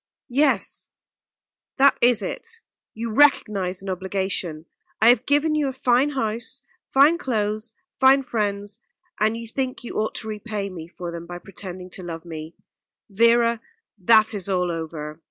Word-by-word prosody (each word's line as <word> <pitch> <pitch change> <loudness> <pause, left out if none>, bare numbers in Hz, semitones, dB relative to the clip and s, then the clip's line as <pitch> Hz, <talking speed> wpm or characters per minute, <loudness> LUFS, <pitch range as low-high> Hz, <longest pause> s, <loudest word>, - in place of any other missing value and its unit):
"Yes, 265 -4 +1 0.9
that 275 0 +6
is 240 -2 +4
it 460 0 -5 0.3
you 225 0 -4
recognise 200 -9 +3
an 195 - -5
obligation. 185 -4 -3 0.3
I 225 - +6
have 245 +1 +3
given 295 +2 +3
you 300 -2 +1
a - - -1
fine 255 +2 +2
house, 235 -5 -3 0.3
fine 295 +5 +5
clothes, 215 -4 -2 0.2
fine 270 +1 +6
friends 205 -3 -2 0.4
and 215 +2 +2
you 230 0 -7
think 255 +2 -3
you 240 - -4
ought 215 - -1
to 220 - -3
repay 210 -2 -4
me 165 -3 -8
for 175 0 -7
them 170 0 -7
by 175 - -6
pretending 185 0 -9
to 185 - -6
love 165 -1 -7
me. 160 -1 -8 0.6
Vera, 230 +2 +3 0.4
that 220 +3 +5
is 200 -2 -1
all 180 -2 +1
over. 155 -2 -6
215 Hz, 155 wpm, -23 LUFS, 185-245 Hz, 0.9 s, that